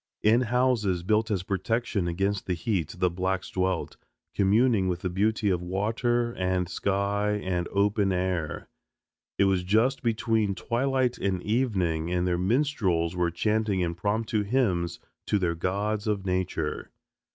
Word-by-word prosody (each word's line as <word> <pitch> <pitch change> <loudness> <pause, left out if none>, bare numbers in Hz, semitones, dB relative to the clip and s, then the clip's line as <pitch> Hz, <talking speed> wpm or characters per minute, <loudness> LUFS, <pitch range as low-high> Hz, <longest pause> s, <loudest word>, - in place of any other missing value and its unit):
In 110 +3 +5
houses 120 -7 +1
built 110 +3 +1
as 95 -4 -1
protection 100 0 -1
against 95 +3 -1
the 90 - 0
heat 85 -2 -2
the 90 - +2
blacks 95 +1 -2
dwelt, 95 -2 -1 0.4
communing 105 0 +3
with 90 -1 -2
the 90 - -2
beauty 105 +2 +1
of 90 -1 0
water 115 +6 0
and 90 -2 -1
sky 100 +3 0
and 90 -4 -2
open 100 0 +2
air. 90 -4 -2 0.7
It - - +4
was 95 -2 +2
just 110 +8 +2
between 110 -3 +1
twilight 130 +2 0
and 95 -2 -1
evening 95 -9 0
and 90 0 0
their 90 -1 0
minstrels 95 - +1
were 90 -1 +1
chanting 105 +2 0
impromptu 105 +6 -1
hymns 100 -7 0 0.3
to 105 - +2
their 90 -4 0
gods 100 +5 -2
of 100 -2 -1
nature. 90 -4 -2
100 Hz, 140 wpm, -27 LUFS, 90-110 Hz, 0.7 s, In